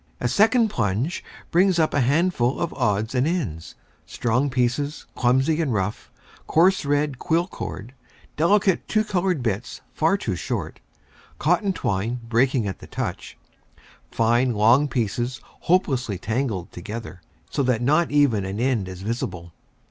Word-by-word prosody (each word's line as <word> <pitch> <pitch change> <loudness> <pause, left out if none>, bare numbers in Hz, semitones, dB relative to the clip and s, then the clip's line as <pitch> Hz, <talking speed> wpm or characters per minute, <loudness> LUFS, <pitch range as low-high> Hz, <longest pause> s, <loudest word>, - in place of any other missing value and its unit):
A 125 - 0
second 220 - +4
plunge 115 - -1 0.3
brings 180 +1 +4
up 160 -2 +2
a 145 - +2
handful 140 -1 +1
of 170 - -2
odds 110 -2 0
and 130 +2 +2
ends, 115 - -3 0.3
strong 125 +4 0
pieces 135 +4 -1
clumsy 130 +6 +2
and 150 -5 0
rough, 105 -1 -2 0.4
coarse 180 +1 +3
red 145 -2 0
quill 170 +2 +1
cord, 125 - -7 0.4
delicate 190 +3 +2
two 215 -1 +2
colored 180 - 0
bits 110 0 -3
far 165 +5 +2
too 105 - -3
short, - - -4 0.6
cotton 175 +5 +2
twine 115 - -2
breaking 120 +1 +2
at 95 - -5
a - - -10
touch, - - -5 0.7
fine 120 +2 +2
long 120 +8 +4
pieces 120 0 -2
hopelessly 135 - 0
tangled 110 -3 -2
together, 105 -4 -7 0.3
so - - 0
that 125 -3 +1
not 155 +6 +3
even 140 -9 +3
an 95 +2 -4
end 120 -6 0
is 95 0 -8
visible. 90 -6 -4
130 Hz, 140 wpm, -23 LUFS, 110-160 Hz, 0.7 s, second